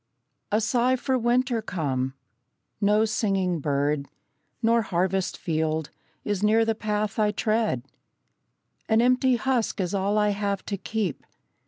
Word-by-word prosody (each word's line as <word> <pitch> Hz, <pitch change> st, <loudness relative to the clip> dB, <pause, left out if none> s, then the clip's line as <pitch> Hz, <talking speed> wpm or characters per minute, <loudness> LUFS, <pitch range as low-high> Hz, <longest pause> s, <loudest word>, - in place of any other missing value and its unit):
A 210 Hz, -, +3 dB
sigh 245 Hz, +3 st, +2 dB
for 260 Hz, +1 st, -1 dB
winter 245 Hz, 0 st, +1 dB
come. 135 Hz, -10 st, -2 dB, 0.7 s
No 210 Hz, +2 st, +4 dB
singing 195 Hz, -5 st, 0 dB
bird, 145 Hz, 0 st, 0 dB, 0.6 s
Nor 230 Hz, +1 st, +4 dB
harvest 190 Hz, -1 st, -1 dB
field, 160 Hz, -2 st, -1 dB, 0.3 s
is 205 Hz, -2 st, -1 dB
near 220 Hz, +2 st, +4 dB
the 225 Hz, -, +1 dB
path 210 Hz, -1 st, -2 dB
I 210 Hz, -1 st, +3 dB
tread; 215 Hz, -, 0 dB, 1.1 s
An 220 Hz, 0 st, +4 dB
empty 255 Hz, +1 st, +4 dB
husk 240 Hz, -2 st, 0 dB
is 180 Hz, -1 st, -1 dB
all 200 Hz, +2 st, +1 dB
I 210 Hz, 0 st, +3 dB
have 200 Hz, -1 st, -2 dB
to 200 Hz, -, -3 dB
keep. 200 Hz, -5 st, -3 dB
210 Hz, 135 wpm, -26 LUFS, 180-225 Hz, 1.1 s, No